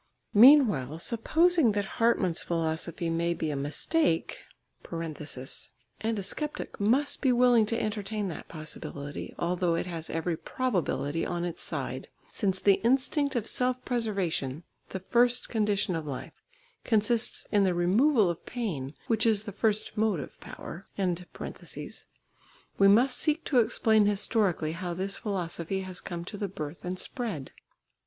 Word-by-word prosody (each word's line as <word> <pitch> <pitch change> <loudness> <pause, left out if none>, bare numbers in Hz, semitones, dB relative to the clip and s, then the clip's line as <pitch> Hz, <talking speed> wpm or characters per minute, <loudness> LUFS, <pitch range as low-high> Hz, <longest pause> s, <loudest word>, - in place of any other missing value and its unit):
Meanwhile, 210 - +6
supposing 290 - +3
that 205 -1 0 0.2
Hartmann's 190 -7 +3
philosophy 165 0 -2
may 170 +1 0
be 155 -2 -2
a - - -2
mistake, 160 - 0 0.5
and 165 -2 -4 1.0
a 200 - -3
sceptic 300 +10 -4
must 250 +8 +2
be 265 - +3
willing 240 -3 +5
to 230 +1 -1
entertain 210 -1 -2
that 165 - -7
possibility, 145 -2 -7
although 175 0 0
it 165 - -1
has 165 -3 -6
every 165 +1 -1
probability 165 - -1
on 175 0 -2
its 170 -2 -4
side, - - -3 0.2
since 190 -4 +1
the 200 -1 +4
instinct 270 +3 +2
of 230 -3 0
self 250 +1 0
preservation, 185 - -1 0.3
the 190 - -4
first 240 +5 +2
condition 210 -4 +1
of 160 -2 -4
life, 135 -3 -6 0.5
consists 220 +1 +1
in 205 -2 +4
the 185 -2 +2
removal 210 - +4
of 170 -1 -3
pain, 160 - -4
which 225 0 +2
is 215 -2 +3
the 205 - -6
first 215 +1 0
motive 210 -10 -1
power, 185 - -9 1.9
we 195 - +7
must 245 +5 +5
seek 315 +1 +1
to 260 - +3
explain 220 -2 +3
historically 200 -5 +1
how 175 +1 -4
this 195 +2 -2
philosophy 185 -2 -2
has 185 -1 -5
come 170 -1 -6
to 205 +2 -7
the 205 - -1
birth 155 -4 -7
and 180 0 -3
spread. 205 - -4
200 Hz, 140 wpm, -29 LUFS, 170-230 Hz, 1.9 s, we